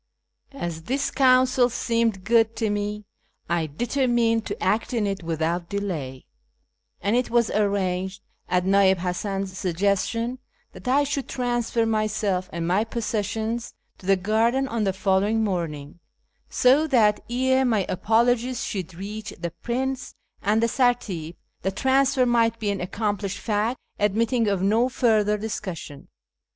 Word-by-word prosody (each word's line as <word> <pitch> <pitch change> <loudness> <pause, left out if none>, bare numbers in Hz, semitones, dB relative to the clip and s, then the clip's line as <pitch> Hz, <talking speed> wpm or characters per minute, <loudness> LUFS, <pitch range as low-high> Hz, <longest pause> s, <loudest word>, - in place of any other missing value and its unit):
As 165 -9 -5
this 275 +3 -1
counsel 255 -1 +4
seemed 230 -5 0
good 225 +1 +3
to 225 -2 0
me, 205 0 -3 0.4
I 170 -2 0
determined 235 - +1
to - - -5
act 230 +3 0
on 220 -3 +1
it 195 -1 -2
without 170 +1 -2
delay; 160 -11 -4 0.8
and 205 +3 +1
it 250 0 +1
was 235 -1 +2
arranged, 195 -2 -1 0.3
at 180 0 +1
Nii'il) 190 0 +4
Hasan's 190 +2 -3
suggestion, 200 +7 -1 0.3
that - - -12
I 275 +3 +4
should 280 -1 -3
transfer 240 -2 0
myself 215 -4 0
and 165 0 -3
my 190 +5 +2
possessions 225 +1 -3 0.2
to 185 - -12
the 195 - +5
garden 225 +7 +1
on 230 -4 -1
the 195 - +1
following 200 +3 +1
morning, 170 -6 -3 0.5
so 275 +5 +4
that 220 -7 +3
ere 260 +2 +2
my 220 -7 +1
apologies 235 +5 +1
should 185 -3 -4
reach 205 +3 -6
the 170 0 -4
prince 255 +7 -3 0.3
and 215 +3 +2
the - - +4
sartip 215 - 0 0.3
the 190 - 0
transfer 265 +5 +2
might 230 -1 +2
be 210 -2 -1
an 200 - -3
accom 205 +3 -2
plished 200 -1 -3
fact, 220 +4 -1 0.2
admitting 225 +3 +1
of 195 -2 0
no 225 +5 +3
further 215 -5 +2
discussion. 185 -9 -6
215 Hz, 140 wpm, -24 LUFS, 190-240 Hz, 0.8 s, the